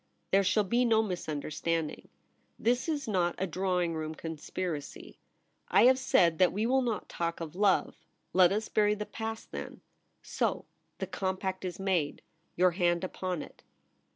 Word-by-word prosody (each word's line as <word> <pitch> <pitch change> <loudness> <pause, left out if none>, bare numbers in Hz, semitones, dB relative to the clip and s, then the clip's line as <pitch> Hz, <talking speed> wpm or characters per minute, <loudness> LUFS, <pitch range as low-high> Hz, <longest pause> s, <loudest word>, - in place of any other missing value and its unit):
There 195 +1 +5
shall 195 +3 +3
be 235 +6 +2
no 225 -2 +4
mis 180 -6 -4
understanding. 155 +1 -2 0.5
This 245 +6 +1
is 290 -4 -2
not 180 -5 +1
a 190 - 0
drawing 180 -1 0
room 160 0 -4
conspiracy. 160 0 -5 0.5
I - - +5
have 260 +2 +6
said 170 -10 +3
that 185 -1 +5
we 210 +4 -1
will 265 +2 +3
not 235 -4 -2
talk 170 0 -3
of 165 -1 -6
love. 200 0 +2 0.4
Let 180 -1 +6
us 215 +2 -1
bury 210 -1 +2
the 210 0 -4
past 225 +1 -6
then. - - -7 0.4
So! - - -1 0.3
The - - -3
compact 190 0 -3
is 185 +1 -5
made. 185 -7 0 0.3
Your 180 +1 +4
hand 175 -1 +1
upon 185 -2 -3
it.' - - -15
185 Hz, 160 wpm, -30 LUFS, 170-210 Hz, 0.5 s, have